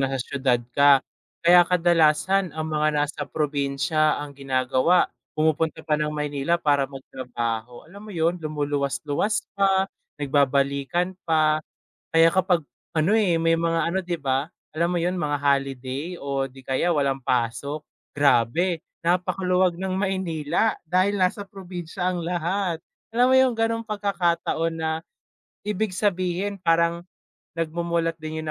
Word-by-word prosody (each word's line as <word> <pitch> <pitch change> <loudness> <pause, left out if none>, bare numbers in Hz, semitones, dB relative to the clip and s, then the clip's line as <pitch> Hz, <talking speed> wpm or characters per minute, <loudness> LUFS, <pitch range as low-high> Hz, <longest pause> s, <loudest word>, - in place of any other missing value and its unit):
nasa 135 0 0
siyudad 130 0 0 0.2
ka, 140 0 +5 0.4
kaya 175 +1 +8
kadalasan 175 +2 +3
ang 155 0 -3
mga 155 0 +2
nasa 145 +1 -1
probinsya 150 +1 0
ang 145 0 -6
ginagawa 135 +4 +2 0.3
pumupunta 160 +1 +1
pa 150 -1 +1
ng 150 - 0
Maynila 150 +1 -1
para 145 -4 +1
magtrabaho. 120 -3 -5
Alam 195 +6 -13
mo - - -8
'yun, 170 +2 +1
lumuluwas 145 -3 -1
luwas 150 +9 0
pa, 195 -1 +3 0.3
nagbabalikan 140 +4 +1 0.2
pa, 155 -1 +3 0.5
kaya 165 0 +6
kapag 180 0 +2 0.3
ano 165 +7 +2
eh, 185 -7 +2
may 165 0 +3
mga 165 0 0
ano 180 +3 0
di 175 -1 -3
ba, 135 +3 -1 0.2
alam 170 +2 +1
mo 175 - 0
'yun, 175 +2 0
mga 150 -4 -1
holiday 140 +3 -1
o 140 -1 -2
di 135 - -14
kaya 130 +6 0
walang 140 -4 0
pasok, 125 +5 -1 0.3
grabe 145 +6 +2 0.2
napakaluwag 180 0 +1
ng 190 0 -3
Maynila, 190 +1 0 0.2
dahil 185 +3 +3
nasa 185 +2 +1
probinsya 180 -2 -5
ang 175 -2 -3
lahat. 175 0 -1 0.3
Alam 245 +2 +4
mo - - +6
'yung 260 -1 +4
gano'ng 225 0 0
pagkakataon 175 -6 0
na 160 -1 -2 0.7
ibig 210 -1 -2
sabihin 185 0 -1
parang 170 -1 +1 0.5
nagmumulat 165 0 -1
din 155 0 -5
'yun - - -8
165 Hz, 135 wpm, -24 LUFS, 140-180 Hz, 0.7 s, kaya